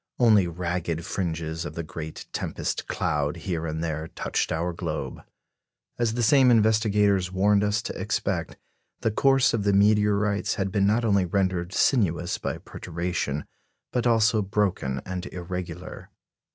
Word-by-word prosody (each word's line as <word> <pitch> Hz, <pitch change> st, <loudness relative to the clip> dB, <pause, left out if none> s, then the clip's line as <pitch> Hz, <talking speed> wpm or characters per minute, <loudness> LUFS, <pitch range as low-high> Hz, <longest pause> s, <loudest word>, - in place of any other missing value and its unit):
Only 110 Hz, -7 st, +5 dB
ragged 85 Hz, -1 st, -3 dB
fringes 80 Hz, -3 st, -3 dB
of 75 Hz, -2 st, -7 dB
the 85 Hz, -, -3 dB
great 80 Hz, 0 st, -7 dB
tempest -, -, -3 dB
cloud 75 Hz, +1 st, -1 dB
here 85 Hz, -2 st, -3 dB
and 80 Hz, +1 st, -3 dB
there 80 Hz, -1 st, -3 dB
touched -, -, -2 dB
our 85 Hz, +2 st, -1 dB
globe. 80 Hz, -6 st, -4 dB, 0.8 s
As 115 Hz, -2 st, +1 dB
the 120 Hz, -, 0 dB
same 130 Hz, +3 st, +5 dB
investigators 105 Hz, -4 st, +3 dB
warned 100 Hz, +2 st, +3 dB
us 105 Hz, +2 st, 0 dB
to -, -, -5 dB
expect, 95 Hz, 0 st, -2 dB, 0.4 s
the 115 Hz, -, +1 dB
course 135 Hz, +3 st, +3 dB
of 110 Hz, -3 st, 0 dB
the 100 Hz, 0 st, +2 dB
meteorites 105 Hz, 0 st, +3 dB
had 95 Hz, -1 st, -2 dB
been 100 Hz, -1 st, +2 dB
not 115 Hz, +3 st, +2 dB
only 100 Hz, -4 st, +3 dB
rendered 90 Hz, -1 st, 0 dB
sinuous 90 Hz, -6 st, +1 dB
by -, -, -3 dB
perturbation, 85 Hz, -4 st, -4 dB, 0.5 s
but 125 Hz, -1 st, 0 dB
also 115 Hz, -1 st, +3 dB
broken 95 Hz, -10 st, -1 dB
and 90 Hz, 0 st, -4 dB
irregular. 90 Hz, -1 st, -6 dB
95 Hz, 145 wpm, -26 LUFS, 85-105 Hz, 0.8 s, Only